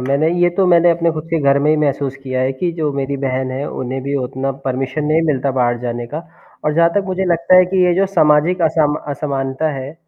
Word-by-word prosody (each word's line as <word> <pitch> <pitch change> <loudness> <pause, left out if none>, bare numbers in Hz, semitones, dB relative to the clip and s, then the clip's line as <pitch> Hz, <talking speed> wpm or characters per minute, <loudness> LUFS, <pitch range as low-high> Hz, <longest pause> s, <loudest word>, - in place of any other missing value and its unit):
मैंने 140 +5 +1
ये 175 - +5
तो 195 - +3
मैंने 175 -1 +5
अपने 170 0 +1
खुद 155 -1 -5
के 165 - +1
घर 140 0 +3
में 150 - +3
ही 155 - +3
महसूस 140 -2 -1
किया 130 -1 -3
है 130 +1 0
कि 170 +7 -2
जो 155 -3 -2
मेरी 140 0 -3
बहन 130 0 -2
है, 135 +2 -4
उन्हें 130 +1 -4
भी 140 +1 -3
उतना 130 +2 -3
परमिशन 135 +3 -2
नहीं 155 +2 +2
मिलता 140 -2 0
बाहर 120 -1 +1
जाने 120 -1 -4
का 150 +6 -5 0.5
और 150 - 0
जहाँ 170 +1 +4
तक 200 - +2
मुझे 190 0 -2
लगता 170 0 +3
है 185 - +7
कि 185 0 +2
ये 180 - +3
जो 195 +2 +2
सामाजिक 165 -1 +2
असमा 155 -2 +1
असमानता 140 +1 -2
है, 135 +3 -6
150 Hz, 240 wpm, -17 LUFS, 135-170 Hz, 0.5 s, है